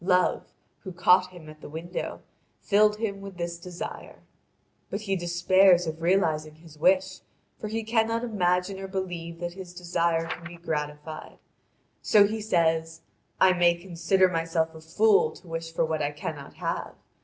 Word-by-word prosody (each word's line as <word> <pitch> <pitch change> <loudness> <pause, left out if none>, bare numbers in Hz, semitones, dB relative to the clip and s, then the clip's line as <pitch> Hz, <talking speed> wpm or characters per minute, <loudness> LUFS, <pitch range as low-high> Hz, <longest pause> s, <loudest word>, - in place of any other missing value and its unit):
Love, 180 0 +2 0.3
who 190 - -8
caught 180 +1 +4
him 175 -4 -13
at 155 0 -13
the - - -9
window, 165 +4 -5 0.4
filled 210 +1 +3
him 200 -3 -3
with 195 -2 -9
this 170 -1 -4
desire. 175 0 -8 0.7
But 200 - -4
he 195 -2 -1
despairs 175 +1 +4
of 160 0 -5
realising 160 -4 +1
his 160 -1 -16
wish, 185 +4 +2 0.4
for 215 - -4
he 225 +1 -3
cannot 225 +1 +1
imagine 185 -3 0
or 195 - -5
believe 175 -3 -5
that 175 0 -3
his 180 -1 -10
desire 170 -2 0
can 165 - -6
be 175 0 -8
gratified. 150 -1 -5 0.6
So 205 -1 +6
he 220 +2 -3
says: 165 -4 +1 0.4
"I 185 -1 +6
may 175 -1 +4
consider 185 +2 +2
myself 165 -2 -1
a 160 - -11
fool 440 - +3
to 180 - -16
wish 165 0 -5
for 165 - +1
what 160 -1 -2
I 145 - +1
cannot 145 -1 -7
have. - - -4
175 Hz, 165 wpm, -27 LUFS, 165-190 Hz, 0.7 s, So